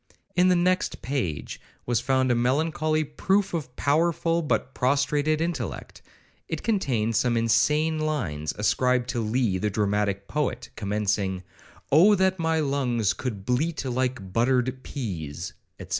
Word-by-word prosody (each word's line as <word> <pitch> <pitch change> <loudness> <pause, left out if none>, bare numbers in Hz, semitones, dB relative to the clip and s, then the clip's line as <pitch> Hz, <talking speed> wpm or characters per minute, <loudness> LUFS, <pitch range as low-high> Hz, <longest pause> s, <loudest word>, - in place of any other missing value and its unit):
In 180 0 +4
the 180 - +4
next 180 +1 0
page 120 - -3 0.2
was 120 -2 +1
found 130 -1 +2
a - - +4
melancholy 155 +5 +1
proof 190 +7 0
of 140 -7 -4
powerful 165 +3 +1
but 140 -4 -1
prostrated 145 +3 +1
intellect. 170 +1 -4 0.5
It - - -4
contained 125 - 0
some 120 +1 +2
insane 150 +8 +2
lines, 100 - -2
ascribed 125 +3 +1
to 120 - -1
Lee 110 -3 0
the 105 - 0
dramatic 100 -1 0
poet, 125 -5 -2
commencing, 100 -2 -1 0.5
'O 185 +9 +7
that 190 -1 +1
my 160 -1 +1
lungs 130 -7 +1
could 105 -7 -5
bleat 140 +5 0
like 125 -6 -2
buttered 130 +2 +1
pease,' 90 - -5 0.3
&c. - - -7
130 Hz, 135 wpm, -26 LUFS, 110-155 Hz, 0.5 s, O